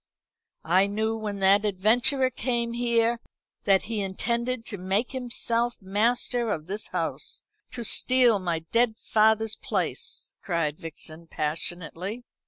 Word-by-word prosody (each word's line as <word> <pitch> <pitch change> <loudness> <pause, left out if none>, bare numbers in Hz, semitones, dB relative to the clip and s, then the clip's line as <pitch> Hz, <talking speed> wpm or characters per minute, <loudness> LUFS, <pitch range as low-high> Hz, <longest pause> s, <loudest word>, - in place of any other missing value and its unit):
"I 185 +4 +4
knew 220 +2 -1
when 210 -2 -4
that 200 +2 +6
adventurer 240 +7 +3
came 235 -2 -1
here, 235 -1 +1 0.5
that 195 -2 +4
he 220 -2 -2
intended 235 +5 -2
to 205 -5 -5
make 195 +6 0
himself 240 -2 -1
master 230 +4 +1
of 155 -7 -2
this 205 +4 -3
house 170 -3 -4 0.3
to 240 - -6
steal 245 -1 +4
my 175 -3 -1
dead 230 -1 +2
father's 220 0 +2
place," - - -3
cried 165 -5 -1
Vixen 165 0 -8
passionately. 175 +8 -4
220 Hz, 125 wpm, -26 LUFS, 190-235 Hz, 0.5 s, that